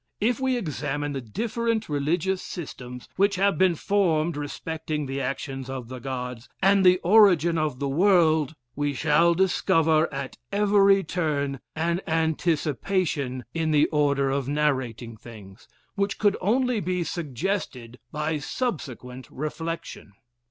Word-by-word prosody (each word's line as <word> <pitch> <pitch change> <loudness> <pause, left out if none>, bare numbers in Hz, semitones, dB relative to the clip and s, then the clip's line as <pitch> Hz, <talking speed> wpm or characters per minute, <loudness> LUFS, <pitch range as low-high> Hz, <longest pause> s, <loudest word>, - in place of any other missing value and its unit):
If 235 +4 +1
we 260 -1 +1
examine 145 - -3
the 135 - -3
different 230 - -2
religious 165 +6 0
systems 125 -7 -8
which 200 +1 +3
have 195 +1 +1
been 185 -2 +4
formed 170 -4 +1
respecting 150 +1 -4
the 135 +1 -3
actions 135 0 -4
of 130 -3 -6
the 130 0 -7
Gods, 125 -1 -5
and 195 0 +4
the 180 0 +6
origin 175 -5 +5
of 155 -5 -1
the 140 +1 -2
world, 160 -2 +3 0.2
we 145 -1 -1
shall 160 +4 +3
discover 165 -3 +2
at 135 -2 -6
every 200 -1 +4
turn 145 -5 -1 0.2
an 170 +3 0
anticipation 160 -3 0
in 165 -1 -1
the 150 -1 +4
order 140 -3 +1
of 135 -1 -1
narrating 130 -6 -1
things, 105 -4 -13 0.3
which 200 0 -1
could 205 -1 +3
only 245 +4 +1
be 180 -1 -1
suggested 135 - -4
by 150 +1 -2
subsequent 130 - -5
reflection. 155 -6 -5
155 Hz, 130 wpm, -25 LUFS, 135-185 Hz, 0.3 s, the